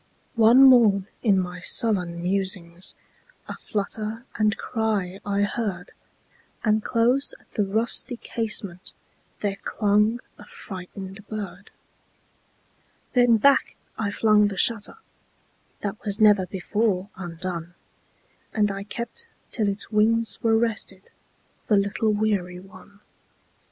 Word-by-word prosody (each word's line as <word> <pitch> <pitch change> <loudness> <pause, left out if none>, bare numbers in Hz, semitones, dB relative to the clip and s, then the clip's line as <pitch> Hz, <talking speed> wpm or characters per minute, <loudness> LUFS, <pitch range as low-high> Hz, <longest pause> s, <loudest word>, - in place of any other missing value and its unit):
One 235 +2 +6
morn, 225 -7 +6 0.2
in 200 -5 +3
my 180 -1 -4
sullen 180 -4 +3
musings,A 185 - -5
flutter 215 +3 -3
and 215 0 +1
cry 210 -5 -2
I 200 0 0
heard; 200 -4 -3 0.7
And 215 -1 +2
close 245 +4 +1
at - - -28
the 210 - +1
rusty 225 +5 +1
casementThere 200 -2 -4
clung 210 +2 +1 0.2
a - - -12
frightened 195 - -9
bird. 200 -3 -7 1.4
Then 245 -2 +5
back 275 +5 +3 0.2
I 210 -2 -2
flung 210 0 +3
the 200 - -4
shutterThat 215 - -4
was 205 0 0
never 205 -4 +5
before 200 +1 -1
undone, 175 -1 -6 0.8
And 210 -2 +2
I 195 0 -5
kept 235 - -5 0.2
till 215 -4 0
its 200 +2 -2
wings 225 +1 +2
were 225 -2 +3
restedThe 220 -4 -2 0.7
little 200 +2 +1
weary 205 -4 -1
one. 195 +2 -16
205 Hz, 105 wpm, -24 LUFS, 190-225 Hz, 1.4 s, One